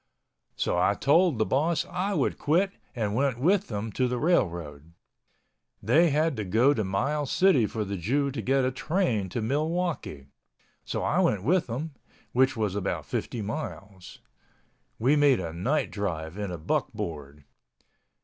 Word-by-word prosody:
So - - 0
I - - +3
told 165 0 +3
the 110 - +2
boss 155 +4 +1
I 190 +2 -2
would - - 0
quit 180 +6 +2 0.2
and 105 -4 -1
went 130 +1 +1
with 190 +8 +2
them 105 0 -4
to 125 +4 0
the 125 0 -2
railroad—they 85 - -2
had 155 +1 +1
to 110 - -2
go 115 +9 +3
to 110 - -1
Miles 135 +10 -1
City 165 - +4
for 110 -1 -3
the 100 0 -4
Jew 135 - 0
to 130 -4 -4
get 135 +4 +2
a 130 - +1
train 130 - -1
to 115 +4 -3
Milwaukee. 155 - -2 0.6
So - - -3
I - - +1
went 100 -3 +2
with 175 - +2
them, 135 +8 -4 0.4
which 130 0 +2
was 105 -4 0
about 100 -2 -2
50 115 -3 -3
miles. 100 -6 -7 0.8
We 130 +6 +3
made 145 -5 +4
a 85 -3 -5
night 130 - -1
drive 85 -5 -4
in 105 -1 -4
a 90 - -5
buckboard. 75 -2 -4
125 Hz, 160 wpm, -27 LUFS, 100-150 Hz, 0.8 s, City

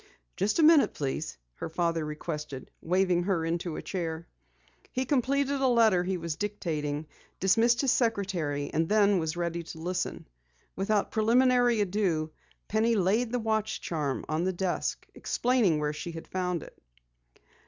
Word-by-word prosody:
"Just 210 - 0
a 330 - +4
minute, 310 -2 +6
please," 140 - -3 0.2
her - - -5
father 165 -1 0
requested, 150 -3 -6
waving 180 0 +2
her 180 -5 0
into 170 0 -2
a - - -6
chair. 165 -3 -4 0.6
He 260 +1 -1
completed 275 +1 +1
a 265 - +4
letter 225 -7 +4
he 185 +1 -1
was 165 -2 -4
dictating, 155 -7 -3 0.3
dismissed 230 +5 +3
his 270 -3 +3
secretary, 190 - 0
and 160 +1 +1
then 205 -2 +4
was 160 0 -2
ready 170 0 -2
to 165 - -10
listen. 180 - -3 0.5
Without 200 +1 0
preliminary 245 +1 +3
ado, 180 -6 0 0.4
Penny 225 +2 +2
laid 215 +5 +1
the 250 - +1
watch 220 -2 -1
charm 150 -5 -2
on 155 +2 -1
the 185 +1 0
desk, 180 0 -2
explaining 235 -10 +1
where 150 0 -1
she 170 +3 -6
had 165 0 -8
found 180 -3 -2
it. - - -13
185 Hz, 155 wpm, -29 LUFS, 160-225 Hz, 0.6 s, minute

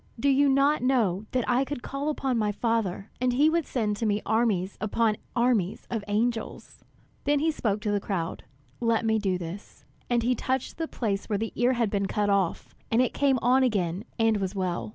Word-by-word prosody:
Do 280 - +2
you 280 +1 +4
not 275 +2 +3
know 220 -6 +1
that 250 -2 -1
I 250 +2 +3
could 275 -2 -5
call 275 +2 -3
upon 270 -4 -1
my 210 -2 +1
Father, 215 -3 -1
and 250 -1 +2
he 295 +5 +4
would 335 -2 0
send 210 -5 -1
to 225 - -2
me 205 0 +1
armies 210 -4 +1
upon 215 0 +1 0.2
armies 235 -6 +1
of 225 -3 -2
angels?" 225 +2 -2 0.4
Then 290 +1 +3
he 315 +3 +2
spoke 210 -8 -1
to 210 -2 -1
the 205 - +1
crowd, 185 -5 -3 0.4
"Let 230 -1 +1
me 220 0 +2
do 190 -3 0
this." 180 +3 -9 0.2
And 240 -1 +2
he 250 +2 +2
touched 260 +4 -2
the 325 - -1
place 205 -8 -2
where 210 - +1
the 225 +2 -3
ear 245 +2 +2
had 235 -4 0
been 200 -1 0
cut 205 +1 0
off, 195 -4 0 0.2
and 225 - +2
it 255 - +2
came 275 -2 +2
on 255 +2 +4
again 195 -7 0
and 225 -2 +3
was 195 0 -3
well. 175 - -2
225 Hz, 210 wpm, -27 LUFS, 205-255 Hz, 0.4 s, you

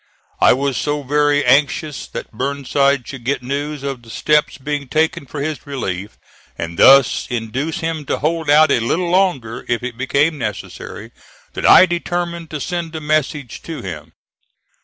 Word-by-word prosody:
I - - +6
was 135 -1 -1
so 145 +2 -1
very 145 +1 +2
anxious 140 +3 +1
that - - -7
Burnside 140 +1 0
should 130 -3 -8
get 130 0 -1
news 140 +2 -3
of 135 -3 -4
the 115 - -16
steps 150 +5 +1
being 145 0 -4
taken 155 0 0
for 145 - -6
his 155 -1 -4
relief, 105 -7 -4 0.4
and 85 0 -5
thus 135 -1 +6
induce 125 +7 -3
him 160 -2 -3
to - - 0
hold 160 0 -1
out 150 0 +6
a - - +3
little 170 +10 -1
longer 155 -12 +1
if 120 0 -1
it 125 -1 -6
became 145 +4 +1
necessary, 105 -5 -6 0.4
that - - 0
I - - +9
determined 175 -1 -3
to 150 - -5
send 170 +1 -4
a - - -3
message 150 -4 -1
to 165 -2 -7
him. 90 -5 -7
140 Hz, 165 wpm, -19 LUFS, 125-155 Hz, 0.4 s, I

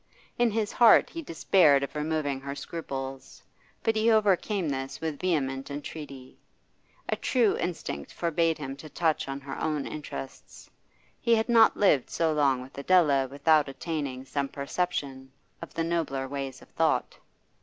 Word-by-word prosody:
In 240 -1 +4
his 215 -1 -1
heart 235 -2 +6
he 335 - -5
despaired 160 - +3
of 140 - -5
removing 150 -2 -1
her 140 +1 -5
scruples, 135 -3 -7 0.4
but 225 - +1
he 220 +1 +3
overcame 205 -3 +2
this 135 -1 -4
with 160 -3 -4
vehement 135 -7 -1
entreaty. 140 -2 -8 0.7
A - - +2
true 235 -6 +2
instinct 70 - -4
forbade 165 -1 0
him 135 -2 -6
to 155 +2 -10
touch 160 -2 0
on 135 0 -4
her 135 -1 -7
own 150 -3 -1
interests; 70 - -8 0.5
he 235 - +3
had 220 +2 0
not 225 -2 +6
lived 150 -11 +3
so 165 -2 +1
long 135 -4 +2
with 130 - -14
Adela 145 -5 +3
without 145 +2 +2
attaining 135 -3 -4
some 140 +1 -2
perception 140 -2 -3 0.3
of 170 - -8
the 165 - 0
nobler 165 -6 -1
ways 135 -1 -5
of - - -19
thought. - - 0
150 Hz, 155 wpm, -28 LUFS, 135-175 Hz, 0.7 s, heart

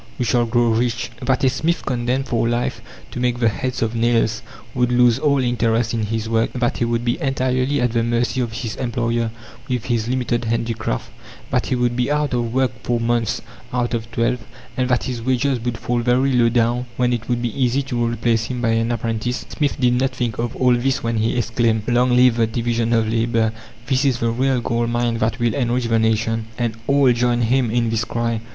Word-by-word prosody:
We 125 - -1
shall 120 -1 +2
grow 120 0 +2
rich." 115 +1 0
That 130 +1 0
a 130 - +5
smith 160 +6 -1
condemned 125 +1 -1
for 115 -1 +1
life 120 +1 -1 0.3
to - - -5
make 125 -1 0
the 115 -2 +3
heads 130 +3 -2
of 115 0 -1
nails 115 0 +1 0.3
would 125 -1 +1
lose 120 -1 +4
all 145 -2 +2
interest 120 -2 +1
in 110 -2 -1
his 110 0 -2
work, 115 0 +1
that 125 -2 0
he 120 - +2
would 115 0 -1
be 120 - 0
entirely 130 +1 0
at 125 -1 +1
the 115 0 +1
mercy 120 +2 0
of 120 -2 -2
his 110 -1 -4
employer 115 -2 -1 0.4
with 125 -3 -2
his 115 -2 0
limited 120 -1 -1
handicraft, 115 - -2 0.4
that - - +1
he - - 0
would 120 -1 0
be 125 +1 0
out 150 -2 0
of 120 -2 -1
work 130 0 +1
four 120 -1 -1
months 115 -1 0 0.3
out 125 -1 -1
of 115 -1 -3
twelve, 115 +2 0 0.4
and 130 0 0
that 125 - +2
his 125 -3 -4
wages 130 +1 +1
would 120 0 -3
fall 120 +1 -1
very 125 +3 +2
low 120 -2 +4
down, 120 +1 +1
when 125 -1 +2
it 115 0 -4
would 120 0 0
be 120 -3 -2
easy 125 +3 +1
to 125 -3 -2
replace 115 -1 0
him 125 +1 -4
by 120 -1 0
an 115 +1 +1
apprentice, 115 +1 -2
Smith 145 -1 -1
did 125 -2 +3
not 135 - +2
think 120 -3 -2
of 120 0 -2
all 125 -1 +3
this 130 +2 0
when 115 0 -1
he 110 +3 0
exclaimed 115 -2 +1
"Long 125 +1 +3
live 125 -1 +5
the 115 -1 +3
division 115 0 -1
of 115 -1 +2
labour. 115 0 +1 0.3
This 130 +1 +1
is 130 -4 +2
the 115 -1 0
real 130 +1 +1
gold 115 0 -1
mine 120 -1 0
that 110 0 0
will 120 -1 +1
enrich 125 -2 0
the 115 -1 +2
nation!" 110 0 0
And 120 -2 -1
all 140 -2 +4
joined 120 0 +1
him 125 +1 +2
in 115 0 +1
this 115 0 0
cry. 115 -1 -2
120 Hz, 220 wpm, -20 LUFS, 115-125 Hz, 0.4 s, a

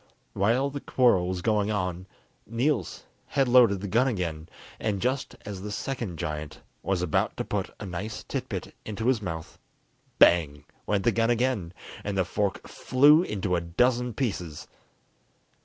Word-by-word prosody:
While 120 +8 +2
the 140 0 -5
quarrel 120 -9 +3
was 90 -1 -3
going 105 -1 +2
on, 90 -3 -2 0.4
Niels 115 - -1 0.2
had 135 -2 +1
loaded 120 -6 +5
the 100 - -4
gun 115 +7 +3
again, 85 -8 -3 0.3
and 105 -3 -1
just 130 +3 -1
as 100 -2 -6
the 105 - -5
second 115 - -4
giant 75 -3 -5 0.2
was 95 0 -1
about 85 - 0
to - - -2
put - - -2
a - - -6
nice 95 +4 -5
tit - - -4
bit - - -5
into 110 +1 -5
his 125 -3 +2
mouth, 80 -4 -6 0.6
bang! 75 -4 +4 0.2
went 100 -2 +1
the 120 - +4
gun 115 +2 +1
again, 120 -7 0 0.3
and 100 -1 -3
the 95 - +2
fork 100 +3 -2
flew 145 +5 +5
into 100 - -1
a 85 - 0
dozen 120 +7 +1
pieces. 90 - -3
105 Hz, 160 wpm, -27 LUFS, 90-120 Hz, 0.6 s, loaded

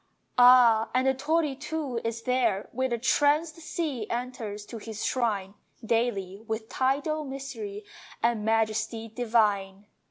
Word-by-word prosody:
Ah, 245 -3 +7
and 255 +1 +3
the 265 - +4
torii 300 +1 0
too 285 -4 -4
is 230 0 -3
there 235 -6 +1
Where 260 +2 -1
the 240 - 0
tranced 295 +6 +2
sea 305 -8 -4
enters 235 -4 -4
to 230 +1 -8
his 220 0 -5
shrine 205 -6 -1 0.3
Daily, 210 -4 -1
with 220 0 -4
tidal 285 +4 0
mystery 350 +10 -6 0.4
And 230 -2 +1
majesty 225 +1 0
divine. 210 -4 0
240 Hz, 130 wpm, -27 LUFS, 220-270 Hz, 0.4 s, Ah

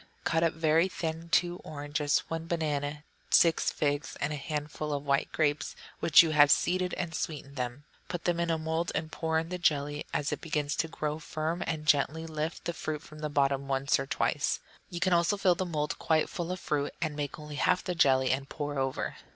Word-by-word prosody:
Cut 165 -1 +1
up 165 -1 +2
very 160 +2 +3
thin 165 -2 -4
two 175 +1 +2
oranges, 145 -1 -1
one 165 0 -4
banana, 150 -3 -1 0.3
six 165 -2 +5
figs, 145 -2 -1
and 145 +2 -1
a - - -2
handful 150 0 -4
of 145 0 -3
white 140 0 +1
grapes, 145 -2 0 0.2
which 165 +1 +7
you 160 - 0
have 145 -2 +6
seeded, 180 +4 +2
and 175 -3 -3
sweeten 145 -4 -4
them. 125 +1 -4 0.2
Put 175 -1 -4
in 170 -1 +1
a 165 - +2
mould 160 +2 -1
and 160 0 -2
pour 160 -1 -1
in 165 +1 -1
the 180 0 -4
jelly; 145 -3 0
as 145 -1 -1
it - - -3
begins 150 -3 -1
to 165 - +1
grow 155 -1 -3
firm 160 +2 -3
you - - -3
can 155 -2 -2
gently 150 +2 +2
lift 160 0 -4
the 170 - -1
fruit 155 -1 -4
from 155 - -12
the 150 0 -3
bottom 140 -1 +1
once 135 0 +2
or 135 - -3
twice. - - 0 0.3
You 175 - -5
can 185 +1 +2
also 170 +4 +3
fill 190 -2 +4
the 185 +1 -3
mould 150 -3 -2
quite 160 -1 +2
full 175 -2 -3
of 185 - -3
fruit, 145 -3 -1
and 155 -2 -2
make 145 -2 -3
only 150 -1 -8
half 180 - +2
the 180 - -2
jelly 130 -5 +4
and 135 +1 -1
pour 145 -2 -3
over. 135 0 -2
155 Hz, 215 wpm, -30 LUFS, 145-165 Hz, 0.3 s, which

